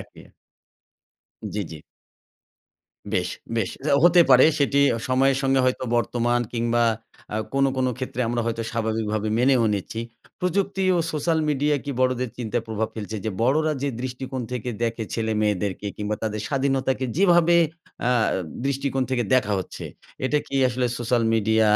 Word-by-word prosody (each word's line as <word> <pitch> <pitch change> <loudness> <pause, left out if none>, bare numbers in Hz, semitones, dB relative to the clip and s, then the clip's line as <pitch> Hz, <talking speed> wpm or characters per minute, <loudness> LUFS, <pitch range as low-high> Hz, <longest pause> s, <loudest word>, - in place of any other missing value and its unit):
একই। - - -13 1.3
জ্বি, 105 - -1
জ্বি। 80 -2 -9 1.3
বেশ, - - 0 0.3
বেশ। 110 -5 0 0.2
যাও 140 -2 +4
হতে 175 0 +7
পারে 130 0 +8
সেটি 140 -1 +2 0.3
সময়ের 135 +1 +3
সঙ্গে 135 0 +3
হয়তো 130 0 0
বর্তমান 120 0 +1
কিংবা 120 0 +1 0.5
আ - - 0 0.2
কোন, 135 0 +2
কোন 130 0 +1
ক্ষেত্রে 130 -1 -4
আমরা 120 0 0
হয়তো 115 0 -1
স্বাভাবিকভাবে 110 -2 -1
মেনেও 125 -1 +4
নিচ্ছি। 100 +3 -4 0.4
প্রযুক্তি 195 +2 0
ও - - +2
সোশ্যাল 160 +2 +1
মিডিয়া 145 0 +2
কি 145 - -3
বড়দের 130 -1 +1
চিন্তায় 120 0 -2
প্রভাব 110 0 -1
ফেলছে 110 0 -5
যে, 110 - -1
বড়রা 155 +6 +2
যে, 140 - +1
দৃষ্টিকোণ 130 +1 -4
থেকে 125 -1 -3
দেখে 115 -1 -1
ছেলেমেয়েদেরকে 105 -3 -1
কিংবা 105 0 -2
তাদের 110 -1 -2
স্বাধীনতাকে 135 -1 0
যেভাবে 175 -2 +5 0.5
আ - - +3 0.6
দৃষ্টিকোণ 140 -1 -1
থেকে 125 -2 +1
দেখা 110 -5 +2
হচ্ছে, 95 - -7 0.4
এটা 150 +3 +2
কি 140 - -7
আসলে 125 0 0
সোশ্যাল 120 0 +1
মিডিয়া 110 0 +3
125 Hz, 145 wpm, -24 LUFS, 110-135 Hz, 1.3 s, পারে